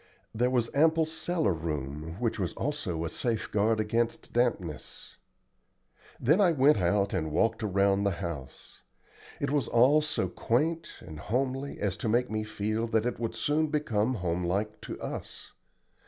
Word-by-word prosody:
There 125 +3 +2
was 120 -3 0
ample 160 +2 +4
cellar 160 - 0
room, 75 -1 -4
which 115 -2 -1
was 90 -3 -1
also 100 - -2
a - - -2
safeguard 110 -1 0
against 115 +2 -1
dampness. 105 -11 -2 1.0
Then 155 - +4
I 180 -4 +5
went 140 -2 +5
out 100 +3 +1
and 80 -1 -1
walked 115 +8 +1
around 100 -1 +2
the 100 - +3
house. 85 -8 -7 0.6
It 140 - -1
was 145 -5 +1
all 130 +6 +5
so 150 -11 0
quaint 160 - 0
and 75 -1 -9
homely 135 - -2
as 100 -2 -1
to 110 - -2
make 120 +2 +1
me 110 0 -1
feel 110 +1 -2
that 110 -1 +1
it 125 - -2
would 115 -1 -3
soon 150 +7 +1
become 130 -6 0
home 90 -2 -1
like 100 +5 -2
to - - -7
us. - - -6
115 Hz, 155 wpm, -29 LUFS, 95-135 Hz, 1.0 s, I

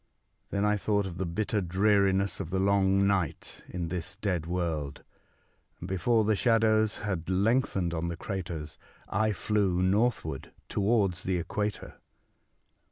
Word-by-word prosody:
Then 100 +1 0
I 105 0 +2
thought 100 0 0
of 90 -2 -6
the 95 - -1
bitter 105 +4 -1
dreariness 95 +1 +2
of 95 -5 -4
the 95 - -1
long 100 0 +3
night 95 -6 -1
in 85 -2 -4
this 90 +2 -4
dead 90 -6 -2
world; 80 -5 -2 0.8
and 85 - -7
before 100 +5 +2
the 110 0 +2
shadows 110 -1 +3
had 95 -5 -3
lengthened 100 -2 +1
on 85 0 -2
the 85 -1 -4
craters 85 -5 -5 0.3
I 110 0 +1
flew 100 -2 0
northward 95 - 0 0.2
towards 100 -4 +1
the 95 -1 0
equator. 105 +4 -4
95 Hz, 140 wpm, -29 LUFS, 85-105 Hz, 0.8 s, long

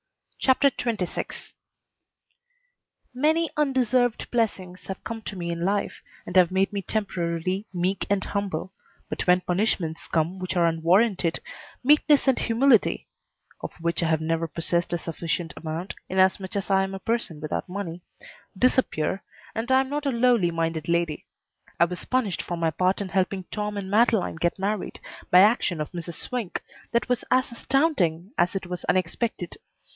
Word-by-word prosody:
CHAPTER 275 +1 +4
XXVI 220 -8 -3 1.6
Many 315 +5 +2
undeserved 255 -4 +1
blessings 190 -6 -2
have 190 - -6
come 225 -1 -5
to 210 - -6
me 170 -2 -3
in 170 0 -3
life 200 +2 -1 0.2
and 175 - -7
have 180 -2 +6
made 190 +2 +1
me 200 - -1
temporarily 185 -1 -2
meek 185 +1 -1
and 200 -1 +1
humble, 195 -2 -3 0.3
but - - -4
when 180 0 +5
punishments 180 -4 -1
come 170 +3 0
which 185 0 -3
are 175 -1 +4
unwarranted, 170 +3 +2 0.4
meekness 295 +1 +5
and 265 - +4
humility 235 0 +3 0.5
(of - - -5
which 170 +1 -1
I 165 - +1
have 160 -1 +2
never 165 +1 0
possessed 170 +2 -1
a 175 - +1
sufficient 165 0 -3
amount, 165 +3 -5 0.2
inasmuch 190 0 +2
as 200 0 -2
I 190 0 +5
am 195 0 -4
a - - -6
person 225 -7 -2
without 155 +3 -3
money) 180 -3 -5 0.6
disappear, 200 -7 +1 0.3
and 230 +3 -3
I 260 0 +6
am 265 - -4
not 290 0 -2
a - - +2
lowly 235 -6 +3
minded 165 -1 -2
lady. 170 -3 0 0.5
I 170 - +7
was 180 +1 -6
punished 240 -8 0
for 175 - -4
my 165 -1 +1
part 185 +4 +1
in 200 -2 -3
helping 190 +1 0
Tom 210 -1 -3
and 195 -1 -5
Madeleine 215 -5 +3
get 170 +1 0
married 200 +1 -2 0.3
by 180 - +8
action 200 -5 +3
of 150 - -3
Mrs. 170 -1 -6
Swink 235 -2 -4 0.3
that 235 - +1
was 250 -2 0
as 255 0 +2
astounding 225 - +1
as 175 - +2
it 195 - -2
was 180 0 -5
unexpected. 185 +1 -1
190 Hz, 160 wpm, -25 LUFS, 170-230 Hz, 1.6 s, by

